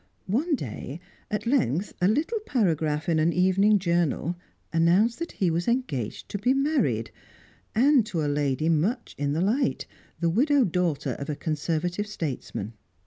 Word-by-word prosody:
One 290 - +1
day, 135 - -6 0.3
at 210 +1 -2
length, 210 - +1
a 180 - +4
little 310 - +1
paragraph 160 - 0
in 165 -2 +2
an 160 +2 +3
evening 190 +4 +4
journal 170 -2 0 0.4
announced 180 +8 +3
that 335 - -5
he 180 -4 +1
was 170 +2 -1
engaged 200 - -2
to 200 - -4
be 250 +6 +2
married, 245 - +1 0.6
and 265 +2 +5
to 165 -6 -2
a - - 0
lady 145 +1 0
much 180 - 0
in 145 0 0
the 160 - 0
light, 235 +9 +1 0.3
the 170 - +1
widowed 265 - +3
daughter 175 -5 0
of 140 - -5
a 150 - -1
Conservative 165 +6 -2
statesman. 135 - -5
180 Hz, 155 wpm, -26 LUFS, 155-230 Hz, 0.6 s, and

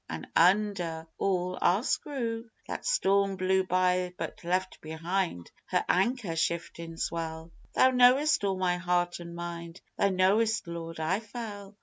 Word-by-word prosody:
An' 80 0 -5
under 180 -3 +2
all, 185 -1 0
our 190 +6 +3
screw. 230 -5 -2 0.2
That - - -5
storm 200 - +2
blew 190 0 +2
by 180 0 +1
but - - -6
left 185 +2 -1
behind 165 - -3 0.2
her - - 0
anchor 195 -2 +1
shiftin' 165 0 -2
swell, 165 0 -4 0.2
Thou 260 - +5
knowest 255 +3 +5
all 195 -1 0
my 180 -1 +1
heart 175 0 0
an' 170 0 -8
mind, 170 0 -6 0.2
Thou 200 - +4
knowest, 205 +5 +2
Lord, 165 -1 -6
I 160 +5 +1
fell. 210 -3 -8
185 Hz, 140 wpm, -29 LUFS, 170-205 Hz, 0.2 s, Thou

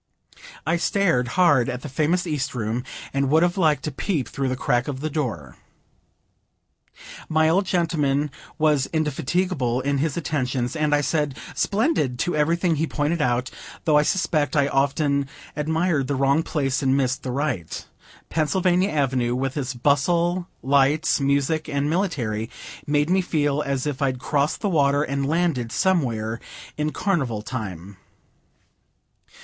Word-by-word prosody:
I 165 +2 +2
stared 170 -9 +1
hard 145 -9 +4
at 125 0 -5
the - - -5
famous 155 +6 0
East 150 -6 -2
Room, 115 +1 -2 0.3
and 140 0 +1
would 160 +4 +4
have 175 0 +1
liked 160 -6 +2
a 150 - -2
peep 145 - -2
through 135 -1 -2
the 130 - -1
crack 120 -1 0
of 135 -3 -4
the 155 +2 -3
door. 105 - -3 1.7
My 155 0 +3
old 185 +4 +2
gentleman 150 -5 +1 0.3
was 150 -4 +2
indefatigable 150 -3 0
in 140 +1 0
his 150 +1 -1
attentions, 130 -5 -1
and 150 -2 +2
I 145 - +2
said, 150 -1 -1 0.2
"Splendid!" 200 - +1
to 175 +6 -1
everything 165 +2 +1
he 160 +2 0
pointed 150 +3 -1
out, 125 -2 0 0.3
though 155 - +4
I 150 - +6
suspect 150 -4 0
I 140 -2 +3
often 140 0 +1 0.3
admired 160 -1 0
the 140 - -1
wrong 140 +3 +3
place, 140 -5 -1
and 135 0 +2
missed 130 -1 0
the 130 - -5
right. 125 - -3 0.4
Pennsylvania 180 +4 +1
Avenue, 130 -6 0
with 130 +1 -2
its 130 -3 -3
bustle, 170 +7 +1 0.2
lights, 140 +4 +3
music, 140 +3 +1
and 140 -1 0
military, 120 - -1 0.4
made 145 +2 +1
me 190 +1 +4
feel 150 -4 0
as 140 -2 -2
if 145 -2 -3
I'd 130 -2 +1
crossed 145 +4 0
the 210 - 0
water 145 -4 +3
and 140 -1 -2
landed 155 -7 0
somewhere 115 -11 0 0.4
in 150 0 -1
Carnival 135 - -1
time. 100 -6 -6
145 Hz, 150 wpm, -23 LUFS, 130-160 Hz, 1.7 s, I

